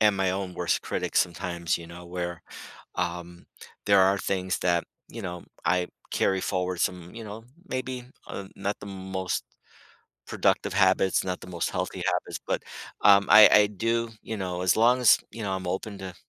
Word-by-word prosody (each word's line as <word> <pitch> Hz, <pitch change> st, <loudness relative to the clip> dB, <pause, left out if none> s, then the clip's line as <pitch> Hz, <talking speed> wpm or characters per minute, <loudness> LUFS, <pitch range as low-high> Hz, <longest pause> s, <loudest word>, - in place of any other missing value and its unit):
am 105 Hz, -2 st, +4 dB
my 95 Hz, -1 st, +1 dB
own 95 Hz, -1 st, -3 dB
worst -, -, 0 dB
critic -, -, -3 dB
sometimes, 85 Hz, -1 st, 0 dB
you 85 Hz, -, -10 dB
know, 85 Hz, +1 st, -11 dB
where, 85 Hz, -1 st, -4 dB, 0.5 s
um, 85 Hz, 0 st, -4 dB, 0.4 s
there 100 Hz, -1 st, +5 dB
are 95 Hz, +1 st, +4 dB
things 95 Hz, -2 st, -1 dB
that, 85 Hz, -1 st, +2 dB, 0.3 s
you 115 Hz, -, -7 dB
know, 90 Hz, -3 st, -6 dB, 0.2 s
I 90 Hz, -1 st, +2 dB, 0.2 s
carry 95 Hz, -1 st, +1 dB
forward 90 Hz, -2 st, -1 dB
some, 90 Hz, -1 st, -2 dB
you 115 Hz, -, -7 dB
know, 110 Hz, +2 st, -8 dB, 0.2 s
maybe, 130 Hz, -1 st, -4 dB, 0.2 s
uh, 100 Hz, -, -6 dB
not 100 Hz, +1 st, -2 dB
the -, -, -10 dB
most 95 Hz, -1 st, -3 dB, 0.8 s
productive -, -, +1 dB
habits, 95 Hz, -1 st, +3 dB
not 90 Hz, -1 st, -3 dB
the -, -, -10 dB
most 85 Hz, -2 st, -2 dB
healthy -, -, -3 dB
habits, -, -, -1 dB
but, -, -, -1 dB, 0.4 s
um, 100 Hz, -1 st, +7 dB
I 110 Hz, 0 st, +10 dB
I 105 Hz, 0 st, +7 dB
do, 115 Hz, +3 st, -1 dB
you 110 Hz, -, -5 dB
know, 90 Hz, -2 st, -3 dB
as 90 Hz, -1 st, +3 dB
long 120 Hz, +3 st, +4 dB
as, 120 Hz, -3 st, +7 dB
you 115 Hz, -, -8 dB
know, 100 Hz, -, -2 dB
I'm 95 Hz, -1 st, -3 dB
open 100 Hz, +3 st, -3 dB
to 95 Hz, -2 st, -7 dB
95 Hz, 180 wpm, -27 LUFS, 90-105 Hz, 0.8 s, I